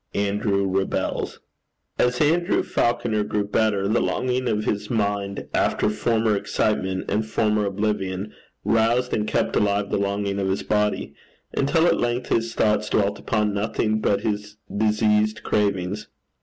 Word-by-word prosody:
ANDREW 100 0 +1 0.2
REBELS. 95 - -2 0.6
As 125 0 +2
Andrew 170 +5 +2
Falconer 115 -2 0
grew 105 0 -1
better, 100 -1 +1
the 110 +3 +2
longing 125 0 0
of 105 -1 0
his 100 - -2
mind 100 -3 -1
after - - +2
former 110 0 +1
excitement 95 -2 -1
and 105 +2 0
former 105 -1 +1
oblivion, 100 -1 -2 0.3
roused 115 +3 +2
and 105 -1 0
kept - - 0
alive 100 0 +1
the - - +1
longing 100 0 -1
of 95 -1 0
his 95 - -1
body, 105 0 0 0.4
until 150 +4 +2
at - - +3
length 120 +1 -1
his 115 0 0
thoughts 105 0 +2
dwelt 100 -1 +1
upon 105 -2 0
nothing 110 +1 0
but 100 -2 +1
his 105 -1 -3 0.2
diseased 105 0 +2
cravings. 100 0 0
105 Hz, 140 wpm, -23 LUFS, 100-110 Hz, 0.6 s, at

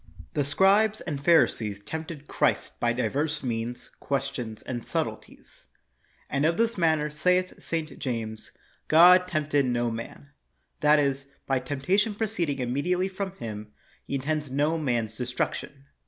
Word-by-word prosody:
The 145 - +1
scribes 200 +8 +3
and 145 -5 -5
Pharisees 110 -11 +3
tempted 160 +2 -6
Christ - - 0
by 120 - +2
divers 145 +5 -1
means, 120 0 -4
questions, 135 -5 -3
and 120 -2 -4
subtleties. - - -5 0.6
And 140 - -1
of 165 +2 +2
this 230 0 +1
matter 160 -4 +2
saith 180 +4 +1
St. 160 -2 -4
James, 110 -4 -4 0.2
* - - -33
' - - -44
God 180 +2 +8
tempted 145 -5 +1
no 120 -1 0
man 115 +5 -8 0.2
' - - -46
'; - - -49
that 150 0 +6
is, 140 -1 0 0.2
by 135 -1 +1
temptation 185 - 0
proceeding 190 -10 -1
immediately 145 +9 0
from 190 0 -4
Him, 105 -2 -7 0.3
He - - -2
intends 150 +2 -2
no 145 +4 +1
man's 120 -7 -1
destruction. 125 +3 -3
145 Hz, 150 wpm, -27 LUFS, 125-170 Hz, 0.6 s, God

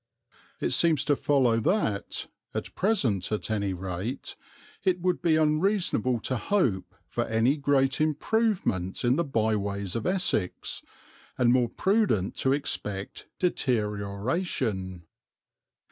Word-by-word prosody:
It - - -1
seems 165 -4 +3
to 145 - +2
follow 130 -6 +2
that, 110 - 0 0.3
at - - -4
present 135 - 0
at 105 +1 -2
any 100 -2 0
rate, 95 +8 -5 0.5
it 185 -2 +2
would 180 0 0
be 165 -3 +3
unreasonable 155 - +2
to 130 - -1
hope 115 - 0
for - - -2
any 115 +5 +2
great 135 -1 +1
improvement 155 - 0
in 120 +2 +4
the 170 - +1
byways 105 - -1
of 115 - -2
Essex, 180 - 0 0.6
and 120 -1 +4
more 125 -2 +3
prudent 190 - +1
to 130 - +1
expect 105 -8 -2
deterioration. 105 - -1
125 Hz, 115 wpm, -27 LUFS, 100-165 Hz, 0.6 s, in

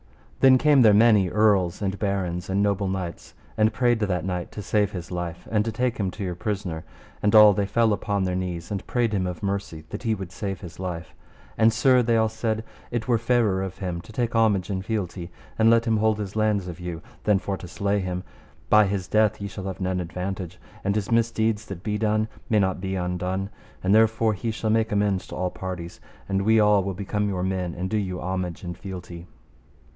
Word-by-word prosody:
Then 130 -1 +7
came 145 0 +5
there 110 -3 +7
many 105 -4 +5
earls, 100 -3 +2
and 95 0 -2
barons, 90 -4 -2
and 100 +2 +2
noble 100 -1 +1
knights, 95 -2 -5 0.2
and 110 0 +3
prayed 120 +1 +2
that 95 -4 -1
knight 90 -2 -3
to 105 - -6
save 105 0 +1
his 90 -3 -7
life, 85 -1 -5
and 105 -2 +2
take 125 +2 -1
him 95 -2 0
to 100 +3 -6
your 90 -2 -2
prisoner. 90 -4 -3 0.4
And 105 +1 +2
all 105 -1 +9
they 100 +1 0
fell 115 +1 +3
upon 100 -1 -1
their 90 -1 -1
knees, 90 -1 -4
and 100 -2 -4
prayed 120 -3 0
him 95 -2 0
of 90 0 -6
mercy, 100 -5 -3
and 80 - -24
that - - -6
he 115 -3 0
would 95 -3 -7
save 95 -3 -4
his 90 -1 -10
life; 90 -2 -5 0.5
and, 115 0 +6
Sir, 125 +3 +4
they 115 -1 +2
all 110 0 +3
said, 110 0 -2 0.3
it 120 -1 -3
were 120 -2 +3
fairer 115 -5 +2
of 95 -1 -5
him 90 -3 -4
to 110 - -14
take 120 +1 -1
homage 105 -4 +2
and 95 -1 -2
fealty, 90 -4 -3 0.3
and 110 0 +6
let 115 0 +4
him 110 -2 +2
hold 110 0 +2
his 105 -1 -5
lands 105 -3 +1
of 85 -1 -7
you 85 -2 -6 0.2
than 105 -2 +4
for 100 0 -3
to 90 - -9
slay 100 +3 -1
him; 90 -1 -3 0.5
by 105 -1 +7
his 95 -2 -2
death 110 +2 +2
ye 100 - -4
shall 95 -1 -7
have 95 -3 -5
none 95 -1 -1
advantage, 90 +1 -5 0.2
and 100 +1 0
his 105 0 -2
misdeeds 115 -2 +1
that 95 -2 -7
be 105 -1 -1
done 110 0 +1 0.2
may 110 - +3
not 95 -3 +1
be 95 0 -2
undone; 90 +2 -2 0.3
and 95 +2 +3
therefore 110 0 +4
he 110 +3 -3
shall 110 -1 -1
make 110 0 +2
amends 100 -2 +1
to - - -8
all 90 0 -1
parties, 90 -2 -6 0.3
and 95 0 0
we 110 +2 +4
all 105 -2 +4
will 95 0 -3
become 105 +1 -1
your 90 -2 -2
men 90 -2 -2
and 90 +2 -4
do 110 - +1
you 95 -3 -2
homage 90 -1 -3
and 90 -1 -5
fealty. 90 -2 -8
100 Hz, 220 wpm, -25 LUFS, 90-110 Hz, 0.5 s, all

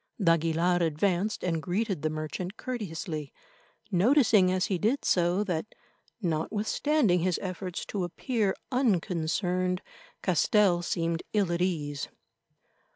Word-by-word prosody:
d'Aguilar 165 -1 +2
advanced 175 +5 0
and 165 -3 0
greeted 190 -1 -1
the 155 - 0
merchant 155 +5 -5
courteously, 165 - -4 0.6
noticing 210 -1 +4
as 185 +1 +1
he 185 -3 -1
did 235 +9 0
so 175 +3 +2
that, 180 0 -3 0.5
notwithstanding 205 - +1
his 180 0 +1
efforts 185 -1 -4
to 200 -3 -3
appear 205 +3 -1 0.2
unconcerned, 180 -5 0 0.4
Castell 185 +1 +3
seemed 170 -1 -1
ill 200 -5 +2
at 170 0 -1
ease. 150 -6 -1
180 Hz, 110 wpm, -28 LUFS, 165-205 Hz, 0.6 s, noticing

